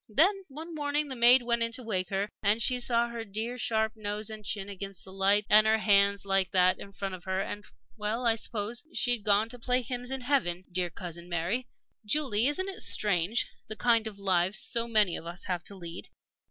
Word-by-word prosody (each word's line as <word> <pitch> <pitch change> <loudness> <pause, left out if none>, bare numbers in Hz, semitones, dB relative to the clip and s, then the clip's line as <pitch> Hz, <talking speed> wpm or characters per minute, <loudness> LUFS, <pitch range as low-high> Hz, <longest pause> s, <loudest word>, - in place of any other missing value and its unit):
Then, 375 - +3
one 320 +5 -8
morning, 295 -1 -1
the 260 - -4
maid 245 +1 +7
went 235 0 0
in 230 0 +1
to 255 - -3
wake 185 -5 -2
her, 195 +1 -1
and 210 +2 +3
she 250 +1 +2
saw 235 -1 +1
her 235 -1 -5
dear 225 +4 -5
sharp 220 -1 0
nose 210 0 -3
and 215 -1 -9
chin 205 -2 -3
against 195 -1 -7
the 190 - -10
light, 200 +2 +2
and 215 +1 +7
her 220 0 +4
hands 200 -2 +3
like 195 -1 +2
that, 185 0 +4
in 200 - -9
front 195 -1 -5
of 185 - -9
her 190 0 -1
and 205 +1 -4 0.3
well, 220 +3 -2
I 230 - +6
suppose, 225 +1 -3
she'd 245 -4 +1
gone 210 +1 +3
to 245 +1 -8
play 250 +1 +1
hymns 245 0 -4
in 265 0 -3
heaven 240 -10 0
dear 175 0 -1
Cousin 170 -1 -7
Mary! 180 +9 -1 0.4
Julie, 240 -1 +1
isn't 375 +7 -1
it 390 - -3
strange 200 +2 +1 0.2
the 215 - -6
kind 230 -1 +2
of 210 -2 -7
lives 190 0 +1
so 235 0 -1
many 215 -6 +3
of 165 - -7
us 175 +2 -7
have 180 -2 -3
to 200 - -8
lead? 170 -1 -9
215 Hz, 220 wpm, -29 LUFS, 195-240 Hz, 0.4 s, maid